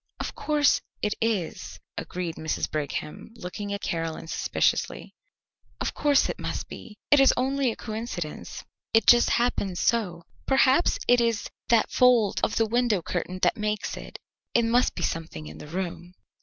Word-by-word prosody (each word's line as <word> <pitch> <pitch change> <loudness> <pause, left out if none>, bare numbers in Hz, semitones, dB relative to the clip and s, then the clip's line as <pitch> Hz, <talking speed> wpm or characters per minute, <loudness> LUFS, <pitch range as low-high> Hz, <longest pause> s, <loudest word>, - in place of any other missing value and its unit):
"Of - - -4
course, 295 -2 +2 0.2
it 210 - +1
is," 215 -7 -2 0.2
agreed 175 -2 -4
Mrs. 160 0 -2
Brigham, 150 +6 -4
looking 205 0 -6
at 200 +1 -3
Caroline 165 -2 -3
suspiciously. 165 - -1 0.7
"Of - - -2
course 290 -2 +3
it - - -4
must - - -4
be. 210 -3 -10
It 290 - +7
is 270 - +7
only 265 0 +1
a - - -6
coincidence. 215 -8 -6 0.3
It 225 - +5
just 240 0 +6
happens 205 -6 0
so. 185 -8 0 0.2
Perhaps 270 +4 +4
it 245 0 +5
is 230 -3 0 0.2
that 230 -2 +3
fold 245 -5 +4
of - - +1
the 225 - +3
window 225 -4 +1
curtain 180 +2 -3
that - - +3
makes 210 0 -2
it. - - -9 0.4
It 235 -1 +4
must 240 +2 +2
be - - -3
something 160 - -3
in 75 +1 -10
the - - -9
room." 175 +1 -5
215 Hz, 160 wpm, -26 LUFS, 175-240 Hz, 0.7 s, It